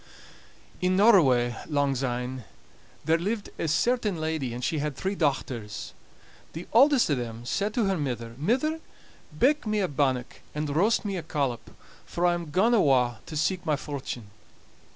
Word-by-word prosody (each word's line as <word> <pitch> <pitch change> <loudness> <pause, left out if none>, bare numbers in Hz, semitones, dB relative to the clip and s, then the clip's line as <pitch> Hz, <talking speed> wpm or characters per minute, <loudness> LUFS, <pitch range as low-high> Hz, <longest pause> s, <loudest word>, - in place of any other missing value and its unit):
In 180 0 +2
Norroway, 140 - +5
langsyne, 130 -3 -1 0.6
there 165 +1 +3
lived 205 +4 -3
a - - -1
certain 210 +5 +1
lady, 155 -5 -2
and 120 +1 -6
she 155 +4 0
had 150 -1 -2
three 190 +7 -2
dochters. 130 - -2 0.6
The 165 +3 -7
auldest 265 - +5
o' - - +4
them 120 -2 -4
said 205 +11 -1
to 235 - +2
her 195 -3 0
mither: 120 -5 -3
"Mither, 260 - +1 0.6
bake 280 - +2
me 215 0 +1
a 190 - +1
bannock, 130 -4 -1
and 150 -1 -2
roast 210 +7 +2
me 200 -2 -2
a - - -3
collop, 140 -7 -2 0.3
for 175 - -2
I'm 175 -2 0
gaun 195 +10 +3
awa' 125 - +3
to 155 - -5
seek 180 +4 0
my 155 -4 +1
fortune." 130 -7 -6
155 Hz, 155 wpm, -27 LUFS, 130-195 Hz, 0.6 s, Norroway